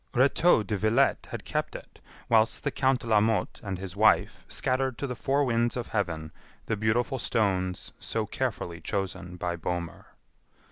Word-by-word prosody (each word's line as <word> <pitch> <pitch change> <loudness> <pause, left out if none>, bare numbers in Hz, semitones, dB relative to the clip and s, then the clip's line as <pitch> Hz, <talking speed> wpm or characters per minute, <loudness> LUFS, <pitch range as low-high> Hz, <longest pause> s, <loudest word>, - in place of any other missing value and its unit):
Rétaux 135 -1 +4
de 105 - -1
Villette 110 +7 +2
had - - -6
kept - - -2
it, - - -11 0.3
whilst 110 0 +3
the 145 - 0
Count 130 -1 +2
de - - -9
la 110 -2 +5
Motte 110 0 0
and 100 -3 -3
his 95 0 -6
wife 110 +1 +3
scattered 130 -1 0
to 140 - -3
the 125 - -3
four 140 +4 +1
winds 120 0 +1
of 120 - -4
heaven 80 -7 -2 0.3
the - - 0
beautiful 115 +5 0
stones 95 -5 0
so - - -2
carefully 85 -1 -3
chosen 95 -2 -3
by 90 -1 -2
Bohmer. 85 0 -4
110 Hz, 170 wpm, -28 LUFS, 95-125 Hz, 0.3 s, la